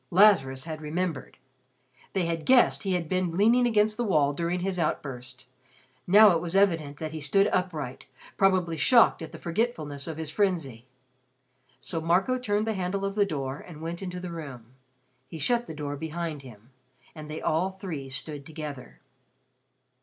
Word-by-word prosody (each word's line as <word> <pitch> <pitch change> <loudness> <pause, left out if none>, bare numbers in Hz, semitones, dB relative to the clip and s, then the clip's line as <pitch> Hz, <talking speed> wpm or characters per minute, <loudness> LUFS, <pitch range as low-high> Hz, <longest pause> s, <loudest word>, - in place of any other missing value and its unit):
Lazarus 170 -10 +4
had 155 -1 -6
remembered. 155 -2 -3 0.8
They 190 -3 +1
had 165 -1 -3
guessed 255 -2 +5
he 195 -2 -1
had 175 -3 -1
been 180 -1 -1
leaning 235 +5 +4
against 215 -2 +2
the 240 - 0
wall 150 -9 +2
during 170 +4 -2
his 185 -1 -2
outburst. 130 -5 -4 0.6
Now 205 +3 +8
it 165 -2 +1
was 175 +1 -4
evident 165 -8 +2
that 155 0 -5
he 160 -1 -6
stood 195 +8 +3
upright, 155 -8 -3 0.3
probably 185 -4 +2
shocked 235 - +5
at 160 -1 -7
the 165 - -9
forgetfulness 165 - -3
of 160 -2 -5
his 160 -2 -5
frenzy. 155 - -1 0.9
So 165 -2 -3
Marco 185 +10 +2
turned 210 -3 0
the 220 - 0
handle 195 +1 -2
of 195 - -2
the 205 -1 +2
door 135 -5 -4
and 165 -4 -11
went 165 +3 -5
into 180 -1 -5
the 180 -1 -6
room. 130 -8 -9 0.5
He 165 - -8
shut 235 - 0
the 160 - -7
door 145 -1 -4
behind 160 0 -4
him, 120 -2 -15 0.4
and 155 -2 -9
they 155 - -5
all 170 +4 +1
three 175 -8 -7
stood 145 +2 -4
together. 150 -4 -8
165 Hz, 170 wpm, -27 LUFS, 150-195 Hz, 0.9 s, Now